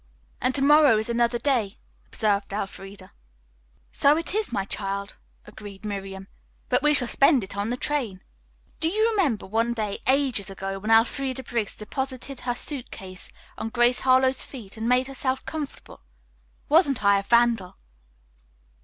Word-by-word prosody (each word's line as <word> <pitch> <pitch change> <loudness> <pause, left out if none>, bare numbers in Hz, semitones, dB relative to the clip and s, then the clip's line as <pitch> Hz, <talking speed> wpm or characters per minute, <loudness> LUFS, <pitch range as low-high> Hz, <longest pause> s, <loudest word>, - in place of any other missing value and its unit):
"And 255 +1 0
to 275 - 0
morrow 295 -4 +6
is 220 +2 -1
another 235 0 +1
day," 235 -7 0 0.3
observed 205 -2 -1
Elfreda. 195 -1 -7 0.8
"So 290 +2 +4
it 335 +2 -1
is, 430 0 0
my 200 -4 -1
child," 200 0 -2 0.3
agreed 205 -1 -11
Miriam, 195 -2 -6 0.4
"but 250 +1 +3
we 300 +1 +4
shall 250 -3 +4
spend 275 -1 +3
it 190 - -8
on 200 +2 -2
the 245 - -2
train." 245 -11 -2 0.6
"Do 320 - +2
you 435 +5 +2
remember 320 - 0
one 230 +4 0
day, 210 -3 -3
ages 260 -7 +1
ago, 195 0 -5
when 215 +3 -5
Elfreda 260 +4 +2
Briggs 230 -4 -3
deposited 265 +4 -5
her 245 -1 -2
suit 275 -1 -4
case 185 -1 -9 0.3
on 225 - -3
Grace 240 +1 +3
Harlowe's 260 0 +3
feet 225 -8 -9
and 225 +1 -3
made 250 +1 +3
herself 265 0 -3
comfortable. 305 -3 -7 0.7
Wasn't 290 - +3
I 200 0 +5
a - - -3
vandal?" 230 -3 +2
235 Hz, 155 wpm, -25 LUFS, 200-270 Hz, 0.8 s, morrow